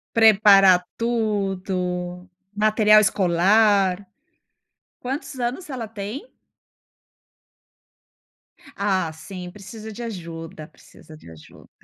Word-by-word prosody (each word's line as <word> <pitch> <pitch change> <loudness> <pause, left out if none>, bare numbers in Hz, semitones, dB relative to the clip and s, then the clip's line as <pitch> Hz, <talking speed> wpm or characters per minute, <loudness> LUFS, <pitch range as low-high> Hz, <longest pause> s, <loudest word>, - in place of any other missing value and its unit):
Preparar 195 -4 +6
tudo, 190 -5 -3 0.2
material 215 0 +4
escolar. 195 +1 +2 0.9
Quantos 270 +1 -6
anos 250 +9 -4
ela 250 -5 -5
tem? 220 - -8 2.4
Ah, 190 -5 -1
sim, 180 +2 -9
precisa 210 +3 -10
de 230 +3 -8
ajuda, 165 -7 -8
precisa 155 -1 -17
de 85 - -16
ajuda. 80 -1 -17
200 Hz, 80 wpm, -22 LUFS, 180-220 Hz, 2.4 s, Preparar